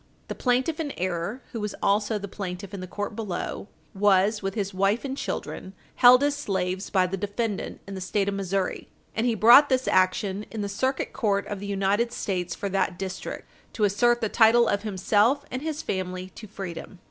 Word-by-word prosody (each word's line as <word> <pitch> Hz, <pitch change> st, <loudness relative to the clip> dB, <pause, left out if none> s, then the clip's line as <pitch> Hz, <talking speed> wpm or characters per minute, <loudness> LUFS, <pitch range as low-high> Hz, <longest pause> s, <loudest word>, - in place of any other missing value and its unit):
The -, -, -2 dB
plaintiff 260 Hz, +5 st, 0 dB
in 295 Hz, -3 st, -3 dB
error, 185 Hz, +7 st, -3 dB
who 230 Hz, -, -4 dB
was 210 Hz, -1 st, -3 dB
also 210 Hz, +2 st, +1 dB
the 200 Hz, -1 st, -6 dB
plaintiff 190 Hz, 0 st, -6 dB
in 200 Hz, -, -5 dB
the 185 Hz, -, -6 dB
court 205 Hz, +3 st, -5 dB
below, 205 Hz, -2 st, -4 dB, 0.3 s
was, 205 Hz, +1 st, +3 dB
with 195 Hz, +1 st, -3 dB
his 200 Hz, -2 st, -2 dB
wife 195 Hz, +6 st, +1 dB
and 270 Hz, -1 st, -3 dB
children, 190 Hz, -7 st, -5 dB, 0.2 s
held 250 Hz, +2 st, +8 dB
as 290 Hz, 0 st, +2 dB
slaves 190 Hz, -7 st, -2 dB
by 185 Hz, -2 st, +3 dB
the 190 Hz, +2 st, -3 dB
defendant 205 Hz, +2 st, -3 dB
in 195 Hz, -, -8 dB
the 190 Hz, -, -6 dB
State 195 Hz, +2 st, 0 dB
of 200 Hz, -, 0 dB
Missouri, 195 Hz, -1 st, -2 dB, 0.3 s
and 225 Hz, +3 st, +1 dB
he 235 Hz, -, +1 dB
brought 240 Hz, +7 st, +8 dB
this 260 Hz, -1 st, +1 dB
action 190 Hz, +2 st, +1 dB
in 220 Hz, -, -5 dB
the 200 Hz, -, -2 dB
Circuit 260 Hz, +7 st, -1 dB
Court 200 Hz, -4 st, 0 dB
of 205 Hz, -, -5 dB
the 200 Hz, -, -6 dB
United 200 Hz, +4 st, +1 dB
States 180 Hz, -6 st, -3 dB
for 200 Hz, -, -4 dB
that 190 Hz, -2 st, 0 dB
district 190 Hz, 0 st, -6 dB, 0.3 s
to 220 Hz, -, -2 dB
assert 240 Hz, +4 st, +3 dB
the 220 Hz, -, +1 dB
title 230 Hz, +1 st, +5 dB
of 200 Hz, -, +1 dB
himself 215 Hz, +7 st, +2 dB
and 255 Hz, -, -3 dB
his 310 Hz, 0 st, -4 dB
family 185 Hz, -1 st, -4 dB
to 215 Hz, -, -10 dB
freedom. 190 Hz, -2 st, -7 dB
205 Hz, 200 wpm, -26 LUFS, 190-235 Hz, 0.3 s, held